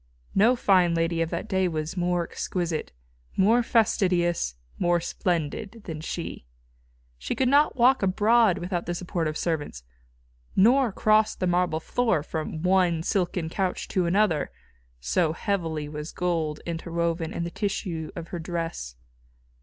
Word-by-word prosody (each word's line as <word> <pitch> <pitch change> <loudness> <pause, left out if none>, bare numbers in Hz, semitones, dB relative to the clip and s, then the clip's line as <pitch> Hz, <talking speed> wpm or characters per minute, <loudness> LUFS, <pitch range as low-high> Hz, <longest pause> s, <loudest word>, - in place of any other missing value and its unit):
No 225 +6 +5
fine 180 -7 +3
lady 165 0 0
of 165 - 0
that - - -4
day 190 -3 +1
was 155 +1 -3
more 175 -1 +1
exquisite, 170 -2 -3 0.5
more 225 +6 +5
fastidious, 180 - +1 0.2
more 175 0 +3
splendid 180 +5 -2
than 160 -5 -6
she. 165 - -5 0.7
She - - -3
could 260 - +1
not 285 +3 +4
walk 260 +2 +4
abroad 210 +1 +4
without 175 -1 -3
the 175 - -2
support 175 -2 -2
of 155 0 -3
servants, 145 - -3 0.7
nor 245 +4 +5
cross 215 +2 +3
the 185 - -2
marble 175 -2 +1
floor 205 -3 0
from 155 0 -4
one 180 -3 +3
silken 180 -3 0
couch 185 +2 -2
to 180 -2 +1
another, 175 -5 +2 0.5
so - - +1
heavily 165 -6 -2
was 150 +1 -6
gold 165 -4 -1
interwoven 170 0 -2
in 170 - -3
the 170 - -4
tissue 170 -6 -3
of 170 -1 -7
her 175 - -5
dresses. 165 - -4
175 Hz, 145 wpm, -26 LUFS, 165-195 Hz, 0.7 s, No